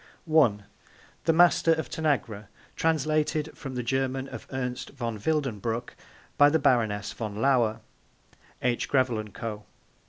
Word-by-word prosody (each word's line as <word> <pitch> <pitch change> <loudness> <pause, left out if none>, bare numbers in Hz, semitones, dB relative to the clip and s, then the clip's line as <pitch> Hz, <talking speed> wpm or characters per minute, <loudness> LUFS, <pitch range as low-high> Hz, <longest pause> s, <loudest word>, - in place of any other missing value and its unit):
(1) 140 -11 +3 0.6
The 165 - +4
Master 170 0 +5
of 160 0 -3
Tanagra. 125 -10 -1 0.3
Translated 155 0 0
from 135 -3 -7
the 125 - -2
German 130 +2 -1
of - - -9
Ernst 125 -1 -4
von 115 -5 -5
Wildenbruch 120 -4 -2 0.5
by 145 0 +8
the 160 - +3
Baroness 110 -8 +1
von 105 -3 -5
Lauer. 115 -2 +2 0.8
(H. 120 -1 0
Grevel 130 -5 +2
and 105 -1 -7
Co.) 110 -3 -5
130 Hz, 130 wpm, -27 LUFS, 115-150 Hz, 0.8 s, by